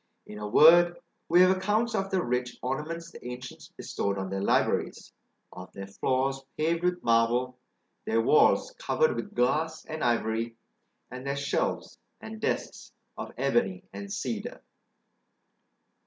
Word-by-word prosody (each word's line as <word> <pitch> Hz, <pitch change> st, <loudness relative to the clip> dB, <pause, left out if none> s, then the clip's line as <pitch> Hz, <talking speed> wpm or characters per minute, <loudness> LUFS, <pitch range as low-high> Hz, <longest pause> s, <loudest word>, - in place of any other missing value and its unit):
In 105 Hz, -, -9 dB
a 105 Hz, -, -4 dB
word, 175 Hz, +8 st, +6 dB, 0.3 s
we 175 Hz, +2 st, +6 dB
have 185 Hz, +1 st, +6 dB
accounts 210 Hz, +5 st, 0 dB
of 195 Hz, 0 st, -1 dB
the 190 Hz, -2 st, 0 dB
rich 125 Hz, 0 st, -2 dB
ornaments 155 Hz, +6 st, -4 dB
the -, -, -13 dB
ancients 125 Hz, +1 st, -8 dB
bestowed 100 Hz, 0 st, -2 dB
on 95 Hz, 0 st, -4 dB
their 95 Hz, 0 st, -2 dB
libraries; -, -, 0 dB, 0.4 s
of 90 Hz, 0 st, -10 dB
their 100 Hz, -, -7 dB
floors 130 Hz, +7 st, -1 dB, 0.2 s
paved 165 Hz, +2 st, 0 dB
with 180 Hz, 0 st, 0 dB
marble, 120 Hz, +2 st, +2 dB, 0.5 s
their 115 Hz, -, +1 dB
walls 150 Hz, -, +4 dB
covered 475 Hz, 0 st, +1 dB
with 205 Hz, -, -6 dB
glass 155 Hz, +6 st, 0 dB
and 155 Hz, 0 st, -5 dB
ivory, 115 Hz, -1 st, 0 dB, 0.6 s
and 125 Hz, 0 st, -7 dB
their 140 Hz, 0 st, -2 dB
shelves 140 Hz, 0 st, -2 dB, 0.2 s
and 110 Hz, 0 st, -9 dB
desks -, -, -3 dB, 0.2 s
of -, -, -7 dB
ebony 120 Hz, -8 st, 0 dB
and 100 Hz, 0 st, -7 dB
cedar. -, -, -4 dB
130 Hz, 140 wpm, -28 LUFS, 115-170 Hz, 0.6 s, word